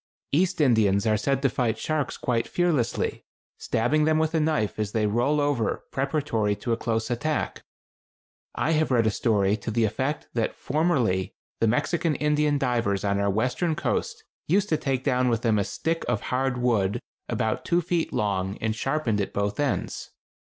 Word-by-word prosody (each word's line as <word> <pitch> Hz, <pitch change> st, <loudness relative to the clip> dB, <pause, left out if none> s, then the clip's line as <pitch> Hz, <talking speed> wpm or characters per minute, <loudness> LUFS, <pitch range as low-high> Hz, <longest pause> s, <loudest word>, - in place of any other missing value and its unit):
East 175 Hz, +5 st, +1 dB
Indians 110 Hz, -8 st, +3 dB
are 110 Hz, -1 st, +3 dB
said 135 Hz, +6 st, 0 dB
to -, -, +5 dB
fight 115 Hz, -2 st, 0 dB
sharks 155 Hz, +1 st, -2 dB
quite 115 Hz, -2 st, -1 dB
fearlessly, 165 Hz, -9 st, 0 dB, 0.4 s
stabbing 145 Hz, +7 st, +1 dB
them 155 Hz, 0 st, +3 dB
with 160 Hz, +1 st, +1 dB
a 160 Hz, -, +2 dB
knife 150 Hz, -10 st, 0 dB
as 105 Hz, -1 st, -2 dB
they 110 Hz, -1 st, +1 dB
roll 120 Hz, +8 st, +1 dB
over 145 Hz, -7 st, 0 dB
preparatory 135 Hz, -7 st, 0 dB
to 110 Hz, +4 st, -4 dB
a -, -, +3 dB
close 115 Hz, 0 st, -2 dB
attack. 150 Hz, +6 st, -2 dB, 0.9 s
I -, -, 0 dB
have 155 Hz, 0 st, +2 dB
read 120 Hz, -3 st, +3 dB
a 110 Hz, -, +3 dB
story 105 Hz, -2 st, +2 dB
to 115 Hz, -, -6 dB
the 115 Hz, +1 st, +1 dB
effect 130 Hz, +8 st, -1 dB
that 115 Hz, -2 st, -1 dB
formerly 130 Hz, -, 0 dB, 0.2 s
the 115 Hz, -, +3 dB
Mexican 150 Hz, +6 st, +1 dB
Indian 150 Hz, 0 st, +2 dB
divers 120 Hz, -7 st, 0 dB
on 100 Hz, -1 st, +1 dB
our 100 Hz, 0 st, +1 dB
western 125 Hz, -, 0 dB
coast -, -, -2 dB, 0.2 s
used 200 Hz, +5 st, +2 dB
to 155 Hz, -, +2 dB
take 135 Hz, -3 st, -1 dB
down 125 Hz, 0 st, +2 dB
with 115 Hz, -1 st, 0 dB
them 110 Hz, -3 st, +3 dB
a -, -, +2 dB
stick 165 Hz, -, -2 dB
of 115 Hz, -4 st, 0 dB
hard 130 Hz, 0 st, +1 dB
wood 110 Hz, -6 st, +1 dB, 0.3 s
about -, -, -1 dB
two 170 Hz, -, +2 dB
feet 170 Hz, 0 st, -1 dB
long 100 Hz, -1 st, -1 dB
and 110 Hz, -1 st, -1 dB
sharpened 125 Hz, -4 st, 0 dB
at 100 Hz, -, -4 dB
both 100 Hz, +3 st, -1 dB
ends. 145 Hz, -2 st, -2 dB
125 Hz, 180 wpm, -26 LUFS, 110-150 Hz, 0.9 s, to